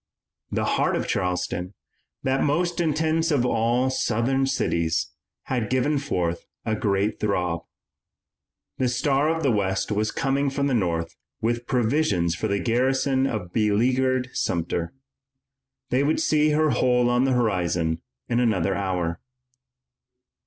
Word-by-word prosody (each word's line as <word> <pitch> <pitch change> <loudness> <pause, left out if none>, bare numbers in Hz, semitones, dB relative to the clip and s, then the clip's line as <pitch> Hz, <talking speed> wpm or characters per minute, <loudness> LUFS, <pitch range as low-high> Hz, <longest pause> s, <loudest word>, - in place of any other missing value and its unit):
The - - 0
heart - - +1
of - - -2
Charleston, 90 +1 -2 0.5
that 135 0 +1
most 170 +4 0
intense 160 +1 +1
of 140 -6 +2
all 120 +2 +1
Southern 130 +2 +1
cities, 85 - 0 0.3
had 120 -5 -2
given 140 +3 +1
forth 90 - -2 0.2
a 110 - 0
great 100 0 0
throb. 90 -5 -1 1.1
The 130 - +2
Star 135 +4 +1
of 165 0 -1
the 135 - +3
West 95 -2 0
was 105 +1 0
coming 135 +3 0
from 140 +1 -1
the 140 - +1
North 85 -7 -1 0.2
with 120 +1 -1
provisions 115 - +1
for 85 - -2
the 100 - 0
garrison 130 +4 +1
of 90 -8 -4
beleaguered 125 +4 +1
Sumter. 85 0 -1 1.0
They 130 +3 +3
would 150 +2 +1
see 155 -1 +3
her 155 0 +2
hull 125 0 +2
on 125 +1 +2
the 135 - +2
horizon 85 -8 0 0.3
in 120 0 +1
another 100 -6 +1
hour. 90 -4 -2
120 Hz, 135 wpm, -24 LUFS, 95-135 Hz, 1.1 s, the